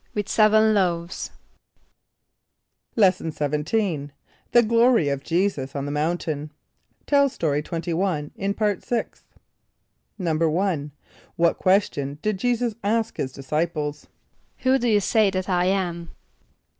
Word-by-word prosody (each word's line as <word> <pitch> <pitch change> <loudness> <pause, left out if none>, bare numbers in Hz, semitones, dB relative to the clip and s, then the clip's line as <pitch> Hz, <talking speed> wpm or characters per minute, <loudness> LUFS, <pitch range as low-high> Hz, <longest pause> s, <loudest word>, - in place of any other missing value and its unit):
=With 205 -1 -2
seven 215 0 +4
loaves.= 175 -3 -1 1.7
Lesson 185 -6 +3
XVII. 150 +2 -1 0.4
The 240 - +6
Glory 230 - +3
of 140 -1 -2
Jesus 165 -6 -1
on 140 0 -2
the 145 - -3
Mountain. 150 -1 -2 0.6
(Tell 280 -1 +4
Story 150 - -1
21 165 -1 -2
in 200 +1 -2
Part 210 -3 0
Sixth.) 240 -2 -3 0.9
=1.= 165 -1 0 0.5
What 170 0 +2
question 145 -7 +1
did 215 -3 -1
J[=e]´[s+]us 240 0 0
ask 225 +2 0
his 130 - -2
disciples? 150 +2 -3 0.6
="Who 260 +1 +4
do 245 - 0
you 210 -2 +4
say 215 +1 +3
that 185 -1 -3
I 180 -2 +1
am?" 175 -3 -1
180 Hz, 120 wpm, -24 LUFS, 150-215 Hz, 1.7 s, The